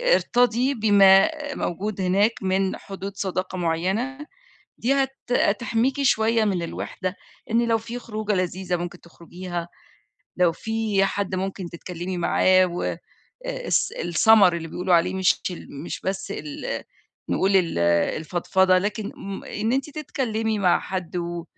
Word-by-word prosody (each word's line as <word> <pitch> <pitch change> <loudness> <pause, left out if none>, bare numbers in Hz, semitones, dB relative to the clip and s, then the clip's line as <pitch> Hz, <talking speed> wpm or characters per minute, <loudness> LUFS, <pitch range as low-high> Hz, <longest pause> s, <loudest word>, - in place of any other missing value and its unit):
ارتضي 245 +2 +2
بما 200 -1 +6 0.3
موجود 195 +3 -3
هناك 195 +5 +3
من 190 0 0
حدود 195 0 -8
صداقة 185 -1 -3
معيّنة، 185 - -1 0.6
دي 250 +4 +1
هت 270 -1 0 0.2
هتحميكِ 240 +4 +1
شوية 225 -3 +3
من 190 -4 0
الوحدة 185 +2 -4 0.4
إن 235 +1 +2
لو 230 -1 +3
في 230 +2 -6
خروجة 215 -2 -3
لذيذة 185 -1 -1
ممكن 175 0 -6
تخرجيها، 175 +1 -7 0.7
لو 180 -2 +3
في 220 +1 0
حد 195 -1 -2
ممكن 190 -1 -4
تتكلمي 175 +1 -5
معاه 185 +2 +4
والس - - -3
السمَر 180 +2 +4
اللي 165 -1 -6
بيقولوا 180 +2 0
عليه 175 +2 +3
مش 190 -1 +2
ال 145 -5 -8
مش - - -5
بس 190 +1 -3
ال 150 -1 -5 0.5
نقول 195 +1 +3
ال 175 - +1 0.4
الفضفضة 185 +4 +2
لكن 205 +2 -3
م 195 0 -7
إن 220 +3 -2
أنتِ 270 +3 -1
تتكلمي 225 -7 -2
مع 180 -2 +3
حد 185 -2 -5
و 170 -1 -3
195 Hz, 135 wpm, -24 LUFS, 180-225 Hz, 0.7 s, بما